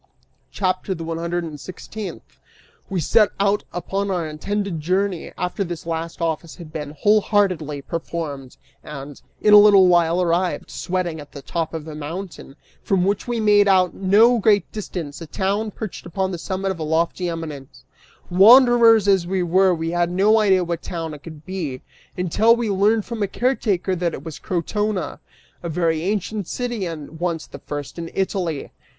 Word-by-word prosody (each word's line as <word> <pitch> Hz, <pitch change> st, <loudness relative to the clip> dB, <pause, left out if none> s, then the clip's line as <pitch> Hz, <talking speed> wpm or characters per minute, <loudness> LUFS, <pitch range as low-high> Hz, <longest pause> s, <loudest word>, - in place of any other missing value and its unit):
CHAPTER 185 Hz, 0 st, -1 dB
THE 165 Hz, -, -6 dB
ONE 165 Hz, 0 st, -4 dB
HUNDRED 170 Hz, +1 st, -2 dB
AND 155 Hz, -3 st, -7 dB
SIXTEENTH. 200 Hz, +5 st, -9 dB, 0.5 s
We 190 Hz, -, -1 dB
set 210 Hz, +6 st, +4 dB
out 200 Hz, +1 st, +1 dB
upon 195 Hz, +3 st, -3 dB
our 180 Hz, -4 st, -1 dB
intended 195 Hz, +3 st, -3 dB
journey, 185 Hz, +2 st, -1 dB
after 180 Hz, +2 st, -2 dB
this 170 Hz, -3 st, -6 dB
last 165 Hz, 0 st, -4 dB
office 165 Hz, 0 st, -2 dB
had 170 Hz, -4 st, -12 dB
been 150 Hz, -1 st, -6 dB
wholeheartedly 190 Hz, -8 st, +2 dB
performed, 155 Hz, -6 st, -5 dB, 0.3 s
and, 140 Hz, -1 st, -9 dB, 0.2 s
in 210 Hz, -, +5 dB
a 210 Hz, -, +11 dB
little 205 Hz, -2 st, +7 dB
while, 175 Hz, -1 st, +3 dB
arrived, 180 Hz, +1 st, 0 dB
sweating, 175 Hz, -3 st, -3 dB
at 145 Hz, -1 st, -12 dB
the 140 Hz, -, -9 dB
top 165 Hz, +2 st, -3 dB
of 160 Hz, -1 st, -6 dB
a 155 Hz, -, -7 dB
mountain, 155 Hz, 0 st, -7 dB, 0.3 s
from 185 Hz, -2 st, +1 dB
which 200 Hz, +4 st, -1 dB
we 240 Hz, -1 st, -1 dB
made 205 Hz, -1 st, +4 dB
out, 185 Hz, -2 st, +4 dB
at -, -, -22 dB
no 215 Hz, +5 st, +4 dB
great 205 Hz, -1 st, +3 dB
distance, 175 Hz, -8 st, -6 dB
a 165 Hz, -, -7 dB
town, 200 Hz, +6 st, -1 dB
perched 210 Hz, -3 st, -7 dB
upon 190 Hz, +2 st, -2 dB
the 175 Hz, -, -5 dB
summit 190 Hz, +2 st, -2 dB
of 185 Hz, -, -6 dB
a -, -, -2 dB
lofty 165 Hz, +3 st, 0 dB
eminence. 155 Hz, -5 st, -7 dB, 0.5 s
Wanderers 230 Hz, +2 st, +7 dB
as 190 Hz, -3 st, +3 dB
we 185 Hz, 0 st, 0 dB
were, 185 Hz, +2 st, +3 dB
we 165 Hz, -1 st, -2 dB
had 175 Hz, 0 st, +1 dB
no 200 Hz, +5 st, +4 dB
idea 190 Hz, -4 st, +3 dB
what 170 Hz, -1 st, -3 dB
town 165 Hz, -3 st, -5 dB
it 150 Hz, -, -9 dB
could 155 Hz, -2 st, -11 dB
be, 165 Hz, -9 st, -5 dB, 0.3 s
until 200 Hz, +6 st, +3 dB
we 235 Hz, -3 st, -1 dB
learned 205 Hz, +3 st, +2 dB
from 230 Hz, -2 st, -5 dB
a 200 Hz, -, +1 dB
caretaker 205 Hz, -7 st, 0 dB
that 170 Hz, -2 st, -1 dB
it 135 Hz, -, -10 dB
was 160 Hz, -3 st, -7 dB
Crotona, 195 Hz, +2 st, -2 dB, 0.4 s
a 170 Hz, -, -4 dB
very 165 Hz, -1 st, 0 dB
ancient 205 Hz, +1 st, -2 dB
city, 240 Hz, -6 st, -3 dB
and 160 Hz, -1 st, -8 dB
once 170 Hz, -2 st, -2 dB
the -, -, -11 dB
first 145 Hz, +2 st, -6 dB
in 165 Hz, 0 st, -5 dB
Italy. 185 Hz, -6 st, -2 dB
180 Hz, 180 wpm, -22 LUFS, 165-200 Hz, 0.5 s, a